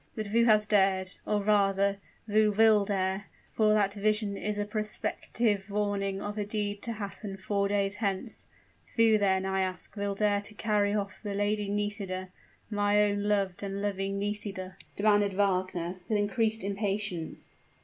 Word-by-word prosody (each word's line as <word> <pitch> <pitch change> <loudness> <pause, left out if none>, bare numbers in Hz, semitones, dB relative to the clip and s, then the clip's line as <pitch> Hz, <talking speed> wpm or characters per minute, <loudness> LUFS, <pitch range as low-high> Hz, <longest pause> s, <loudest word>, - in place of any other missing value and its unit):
"But 215 - -3
who 230 +3 +3
has 215 -2 +5
dared 190 -3 +2 0.2
or 210 -1 +1
rather, 200 -1 +2 0.3
who 215 0 +3
will 215 -1 +5
dare 195 0 -1 0.2
for 215 -1 +3
that 200 -2 +2
vision 210 0 0
is 210 +1 -3
a 205 - -1
prospective 210 0 -1
warning 200 -1 -1
of 205 +1 -4
a - - +1
deed 205 -1 -3
to 230 - -1
happen 200 -1 -6
four 200 +1 0
days 200 -1 0
hence 200 -3 -2 0.5
who, 225 -2 +5
then, 190 -2 +2
I 190 0 0
ask, 185 +2 -3
will 200 -1 -2
dare 205 0 +2
to 210 +1 -12
carry 205 -1 +1
off 205 0 -3
the 205 -2 -4
Lady 205 0 0
Nisida 200 -2 -2 0.4
my 205 0 +2
own 205 0 0
loved 200 -3 0
and 200 0 -4
loving 195 -1 -2
Nisida?" 200 -2 -3 0.2
demanded 205 -1 +3
Wagner, 185 -2 0
with 215 - +2
increased 220 +1 +1
impatience. 200 -3 -3
205 Hz, 160 wpm, -29 LUFS, 195-210 Hz, 0.5 s, has